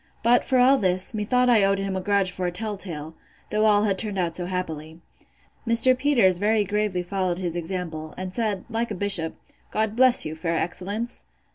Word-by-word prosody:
But, 240 +2 +4
for 260 - +1
all 260 +2 +5
this, 185 +1 +2
methought 250 +4 +1
I 230 -4 +4
owed 195 0 +2
him 195 -1 -3
a 190 - -2
grudge 200 -1 +1
for 180 0 -3
a - - -2
tell 210 +4 -4
tale, 160 -5 -6 0.4
though 215 +1 +1
all 210 -1 +4
had 195 -3 0
turned 210 -3 -3
out 170 -3 -1
so 175 -1 -3
happily. 160 -3 -5 0.7
Mr. 230 +3 +4
Peters 245 -10 +2
very 210 +1 +2
gravely 205 -2 -2
followed 185 -1 -2
his 175 -2 -4
example, 165 -3 -5
and 185 0 -6
said, 215 -4 -2
like 230 0 -3
a 210 - -4
bishop, 185 -4 +2 0.3
God 220 0 -2
bless 255 0 +5
you, 155 - -4
fair 165 +1 -3
excellence! 200 +8 -1
195 Hz, 200 wpm, -24 LUFS, 180-220 Hz, 0.7 s, all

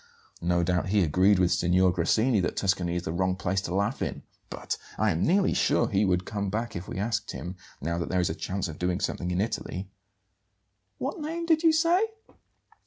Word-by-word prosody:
No 85 0 +1
doubt 90 +1 0
he 100 -1 +3
agreed 90 +5 +4
with 90 -1 +3
Signor 90 +1 +3
Grassini 110 +7 +2
that 90 - -1
Tuscany 95 -3 0
is 90 - -2
the 80 - -3
wrong 95 +1 +1
place 95 +1 -1
to 90 -1 -4
laugh 100 +6 0
in. - - -3 0.3
But - - -4 0.2
I 110 0 +2
am 80 0 -1
nearly 190 +3 +3
sure 120 - +2
he 100 +1 +2
would 90 -1 +1
come 100 -2 -3
back 115 +3 -3
if 85 +2 -5
we - - -6
asked 105 +2 -2
him, 90 +2 -6 0.2
now 85 +3 -2
that 85 - -3
there 90 - +1
is 90 -2 +1
a - - -2
chance 95 +3 -3
of 80 -2 -8
doing 90 +1 0
something 90 - -2
in 90 0 -1
Italy." 95 -3 -3 1.1
"What 275 +6 -3
name 330 +3 -3
did 320 -2 +3
you 330 -2 +5
say?" 335 +5 +3
95 Hz, 210 wpm, -27 LUFS, 90-110 Hz, 1.1 s, you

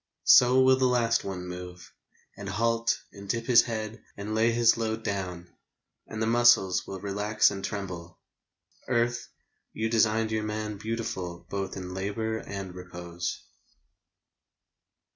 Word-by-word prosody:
So 125 +1 +7
will 130 0 +5
the 130 -1 +3
last 120 -2 +2
one 95 -2 -5
move, 90 0 -9 0.4
And 100 -1 -7
halt, 115 +3 +1 0.2
and 100 -1 -11
dip 115 +1 -1
his 120 -1 +7
head, 110 -1 -5 0.2
and 105 +2 -5
lay 110 +2 +3
his 115 0 +4
load 110 -1 -2
Down, 90 -4 -4 0.6
and 110 - -6
the 110 - +1
muscles 115 -6 +4
will 95 - -6
relax 105 +3 +2
and 100 -1 -6
tremble... 90 -4 -5 0.7
Earth, 120 -1 0 0.5
you 110 0 -2
designed 110 0 +2
your 110 0 0
man 105 0 -4
Beautiful 95 -6 -4
both 100 -1 -3
in 90 -1 -6
labour, 110 +4 -2
and 95 -4 -7
repose. 85 -1 -6
105 Hz, 140 wpm, -28 LUFS, 95-115 Hz, 0.7 s, So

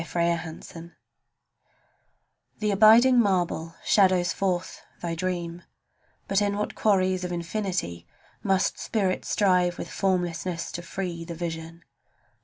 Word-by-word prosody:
AITKEN 170 -1 -2
SCULPTOR 170 0 -11 1.6
The 210 -1 0
abiding 225 +5 +6
marble 175 -5 0
shadows 185 -3 +3
forth 185 -2 -2 0.2
thy 170 -1 -3
dream; 175 0 -3 0.7
But 200 +1 +2
in 200 0 0
what 210 - -2
quarries 185 -3 +2
of 180 - -3
infinity 170 - -3 0.3
Must 190 -1 +1
spirit 195 -4 -1
strive 180 -3 +2
with 170 - -6
formlessness 180 -2 -1
to 175 - -5
free 175 -1 -5
The 170 0 -7
vision? 165 0 -6
180 Hz, 115 wpm, -26 LUFS, 170-195 Hz, 1.6 s, abiding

